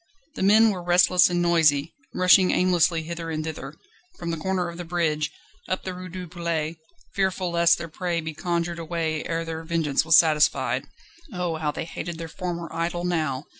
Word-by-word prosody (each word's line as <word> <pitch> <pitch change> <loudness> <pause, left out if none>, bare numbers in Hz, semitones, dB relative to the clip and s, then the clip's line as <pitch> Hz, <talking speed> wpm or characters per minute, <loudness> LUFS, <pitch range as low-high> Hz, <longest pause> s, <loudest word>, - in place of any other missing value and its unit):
The - - -7
men 215 +3 +5
were 185 -3 -5
restless 180 +1 +4
and 175 0 0
noisy, 160 -3 +3 0.2
rushing 185 0 +5
aimlessly 175 -2 +2
hither 165 0 -6
and 155 -1 -3
thither, 155 -2 -6 0.4
from 170 -1 -4
the 165 - -3
corner 185 +2 -1
of 170 0 -8
the 175 - -5
bridge, 160 -3 -1 0.4
up 185 - -2
the 185 - -4
Rue 185 0 -8
du 180 0 -7
Palais, 165 -2 -3 0.4
fearful 190 -2 -1
lest 170 0 +4
their 170 - -6
prey 170 +1 -2
be 160 -1 -5
conjured 170 +1 -2
away 160 -1 -2
ere 165 0 -2
their 160 0 -5
vengeance 160 -4 0
was 160 -1 +6
satisfied. 155 -2 +3 0.5
Oh, 180 -4 -2
how 155 -1 -1
they 150 - -4
hated 170 0 -6
their 165 0 -6
former 170 0 -5
idol 170 +1 -2
now! 155 -6 -1
170 Hz, 185 wpm, -24 LUFS, 160-180 Hz, 0.5 s, was